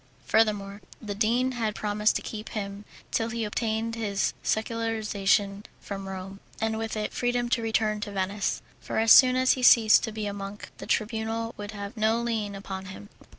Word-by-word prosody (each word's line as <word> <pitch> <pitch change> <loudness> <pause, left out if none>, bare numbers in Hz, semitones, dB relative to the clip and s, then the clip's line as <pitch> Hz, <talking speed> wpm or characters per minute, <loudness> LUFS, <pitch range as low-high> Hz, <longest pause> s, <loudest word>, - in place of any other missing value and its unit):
Furthermore, 210 -2 +1 0.2
the 210 -3 -5
dean 235 +5 +1
had 225 -4 -2
promised 210 0 +1
to - - -2
keep 215 -1 -6
him 200 -1 -5 0.3
till 225 0 0
he 230 -1 -2
obtained 220 +1 -1
his 205 -4 -1
secularization 215 -3 0 0.2
from 195 -1 -6
Rome, 190 +1 -7 0.2
and 220 0 -1
with 225 -1 -3
it 210 - -3
freedom 245 0 0
to 235 - +1
return 220 -1 0
to 205 - -4
Venice, 200 +1 -2 0.2
for - - -5
as 225 0 +4
soon 255 -1 +8
as 255 0 +4
he 255 - 0
ceased 225 -3 +7
to 225 - -5
be 215 -1 -4
a 205 - -3
monk 200 +1 -7
the - - -8
Tribunal 225 +1 -1
would 205 0 -7
have 200 -1 -7
no 220 +1 +2
lien 220 -4 -2
upon 190 -1 -6
him. 190 +2 -10
215 Hz, 185 wpm, -27 LUFS, 200-225 Hz, 0.3 s, soon